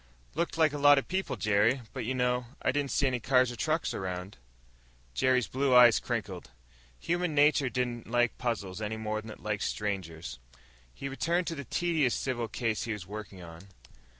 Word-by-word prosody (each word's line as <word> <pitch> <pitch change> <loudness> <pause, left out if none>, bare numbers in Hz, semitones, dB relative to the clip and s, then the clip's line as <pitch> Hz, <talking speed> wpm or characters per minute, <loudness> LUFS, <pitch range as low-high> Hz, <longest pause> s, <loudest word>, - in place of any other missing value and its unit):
"Looked 170 +2 -2
like 155 -3 +4
a 145 - -3
lot 145 0 +7
of 140 - 0
people, 190 +1 -2
Jerry. 110 +5 +2
But 130 -4 -4
you 130 +3 -1
know 125 -1 0 0.2
I - - +3
didn't 140 0 -1
see 140 - +1
any 130 -2 +1
cars 125 0 +3
or - - -7
trucks 155 +8 -1
around." 90 +1 -5 0.8
Jerry's 125 - +2
blue 135 0 +1
eyes 120 -2 +8
crinkled. 105 -7 -4 0.5
Human 175 -2 -1
nature 145 -2 +4
didn't 120 -3 -3
like 120 0 +2
puzzles 105 -5 -3
any 110 +1 -3
more 110 -1 -3
than 110 - -11
it 110 - -11
liked 105 -1 -2
strangers. 85 -10 -3 0.5
He 135 - -6
returned 170 +7 0
to 165 - -3
the 140 -2 -6
tedious 160 -2 +1
civil 120 -3 -2
case 115 -1 -2
he 115 - -2
was 105 -4 -7
working 100 -2 -8
on. 85 +3 -11
120 Hz, 185 wpm, -30 LUFS, 105-140 Hz, 0.8 s, eyes